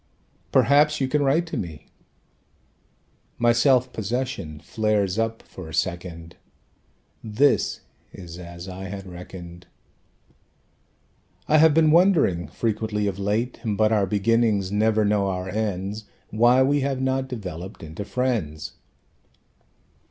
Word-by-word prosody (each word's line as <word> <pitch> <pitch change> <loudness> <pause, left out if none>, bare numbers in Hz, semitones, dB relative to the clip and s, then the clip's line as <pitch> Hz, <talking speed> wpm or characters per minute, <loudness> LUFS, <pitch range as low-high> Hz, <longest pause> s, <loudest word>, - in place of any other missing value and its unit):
"Perhaps 145 +4 +4
you 135 - +1
can 150 +3 +1
write 145 +5 +2
to 165 - -5
me." 80 -5 -6 1.5
My 120 0 +4
self 125 +1 +3
possession 110 - -3
flares 105 +2 0
up 115 0 -2
for 90 -4 -10
a 80 - -5
second; 85 -2 -4 0.9
This 120 +7 +1 0.3
is 90 -2 -10
as 85 +1 -9
I 95 +1 -7
had 95 0 -7
reckoned. 90 -1 -10 1.8
"I 155 - +5
have 160 -1 +5
been 160 -1 +5
wondering 160 - +3
frequently 105 +3 -2
of 100 -1 -2
late 105 +5 -1
(But 110 -1 +1
our 105 -3 +2
beginnings 105 -1 +1
never 110 +1 +2
know 100 -1 +2
our 90 -1 -3
ends!) 105 0 -3 0.3
Why 120 +4 +4
we 145 +2 +2
have 135 -1 -1
not 130 0 0
developed 95 -8 -7
into 80 +5 -6
friends." 105 - -2
105 Hz, 120 wpm, -24 LUFS, 90-130 Hz, 1.8 s, I